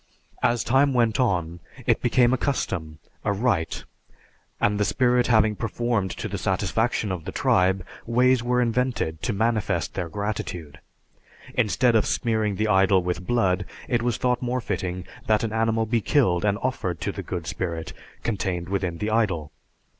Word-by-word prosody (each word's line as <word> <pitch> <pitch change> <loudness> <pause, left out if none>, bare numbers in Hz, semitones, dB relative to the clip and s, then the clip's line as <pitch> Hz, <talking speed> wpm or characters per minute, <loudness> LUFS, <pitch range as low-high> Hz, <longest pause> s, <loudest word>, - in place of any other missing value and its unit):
As 120 0 +2
time 135 +3 +3
went 115 -2 +2
on, 85 -8 0 0.3
it - - +2
became 120 0 +3
a - - +2
custom, 90 - -2 0.3
a - - +1
rite, 100 -6 0 0.8
and 105 0 +1
the - - +3
spirit 125 +2 +2
having 110 -2 +4
performed 115 -2 -1
to - - -3
the - - -4
satisfaction 110 -2 0
of 90 -4 -4
the - - -4
tribe, 95 0 +2 0.2
ways 125 +1 +3
were 125 +1 +2
invented 115 -9 -1
to - - -1
manifest 105 -7 0
their 90 -3 -3
gratitude. 90 -6 -4 0.7
Instead 120 +1 +2
of 110 - +3
smearing 110 -3 0
the 110 +3 0
idol 95 -2 +4
with 90 0 -3
blood, 100 -5 +2 0.2
it 120 -2 +1
was 120 -1 0
thought 125 -1 0
more 125 0 -1
fitting 90 -5 -3 0.2
that 110 0 +3
an 110 -1 -2
animal 115 0 +1
be 115 +1 0
killed 100 - +2
and 100 -1 +2
offered 95 -10 -2
to - - -1
the - - -6
good - - -5
spirit 85 -3 -4 0.3
contained 95 -5 -2
within 95 -4 -1
the 105 +5 -2
idol. 95 -10 0
110 Hz, 165 wpm, -25 LUFS, 90-120 Hz, 0.8 s, having